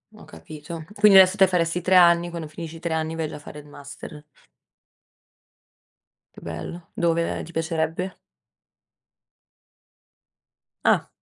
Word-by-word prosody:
Ho - - -14
capito. 155 - -10
Quindi 205 -2 +6
adesso 190 +1 +6
te 190 -2 +6
faresti 175 -1 0
3 185 +2 +2
anni, 170 -1 +5
quando 170 -2 -6
finisci 160 +1 -9
i - - -10
3 170 0 -3
anni 160 0 -2
vai 160 -1 -2
già 150 - -8
a - - -11
fare 150 0 -11
il 145 - -14
master. 145 +1 -11 2.1
Che - - -13
bello. 85 - -8
Dove 170 -1 0
ti 170 - -11
piacerebbe? 165 +2 -3 2.7
Ah. - - +3
165 Hz, 135 wpm, -23 LUFS, 155-175 Hz, 2.7 s, Quindi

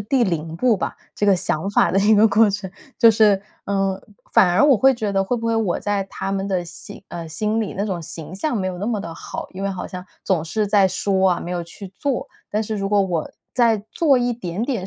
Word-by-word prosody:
第 240 +4 +1
0 165 -3 -3
步 240 +3 +3
吧， - - -4 0.2
这 205 - 0
个 195 -2 +5
想 165 +1 -2
法 - - +3
的 195 - +2
一 210 +2 +5
个 215 +1 +6
过 215 +1 +4
程， 195 -1 -4 0.3
就 230 - +8
是， 210 -3 +4 0.2
嗯 195 -1 -1 0.3
反 180 - +5
而 185 +11 +4
我 285 -3 +6
会 270 +3 +5
觉 215 -4 -2
得 195 - +2
会 240 +6 -1
不 230 - -4
会 230 - +1
我 220 -6 0
在 205 -1 -1
他 195 0 -5
们 195 0 -2
的 185 -2 -1
心 195 +4 -11
呃， 170 -1 -7
心 215 +7 -1
里 215 - -3
那 200 - -1
种 190 -5 -3
形 165 +1 -8
象 240 +6 -1
没 190 - -1
有 185 -1 -4
那 205 - -3
么 225 -3 0
的 165 -4 -6
好， - - -7
因 190 +1 -7
为 200 - 0
好 190 -2 -4
像 180 0 -8 0.2
总 180 -5 +1
是 210 +6 -1
在 200 -2 +4
说 190 0 +1
啊， 175 - -2
没 175 - -6
有 175 -1 -2
去 180 +4 -10
做。 275 +4 -2 0.2
但 215 +1 0
是 220 0 -4
如 195 -1 -2
果 205 0 +3
我 175 -4 -2 0.2
在 230 -4 +3
做 300 -5 +3
一 245 -1 +1
点 200 -3 -4
点 235 -8 -2
200 Hz, 265 characters per minute, -21 LUFS, 185-220 Hz, 0.3 s, 就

